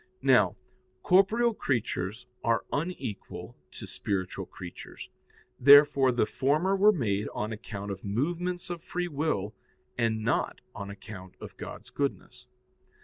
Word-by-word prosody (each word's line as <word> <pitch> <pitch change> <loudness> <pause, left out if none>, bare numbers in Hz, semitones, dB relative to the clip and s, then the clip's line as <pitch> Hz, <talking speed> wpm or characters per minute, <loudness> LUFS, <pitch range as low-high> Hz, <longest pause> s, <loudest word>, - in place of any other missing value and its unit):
Now, 110 -8 +5 0.5
corporeal 220 +6 +4
creatures 115 - -2 0.2
are 115 -1 +1
unequal 145 - -4 0.2
to - - -7
spiritual 95 -1 -3
creatures. 90 -2 -9 0.5
Therefore 140 -1 +7
the 120 -3 +2
former 150 - +1
were 205 +2 +6
made 105 - 0
on 105 +1 -2
account 105 -2 -6
of 95 -1 -7
movements 175 - -2
of 170 -2 -5
free 175 +1 -3
will, 140 - -1 0.5
and 110 -2 +1
not 115 - 0
on 100 -1 -6
account 100 -2 -10
of - - -9
God's - - -9
goodness. 125 -3 -3
125 Hz, 125 wpm, -29 LUFS, 105-160 Hz, 0.5 s, Therefore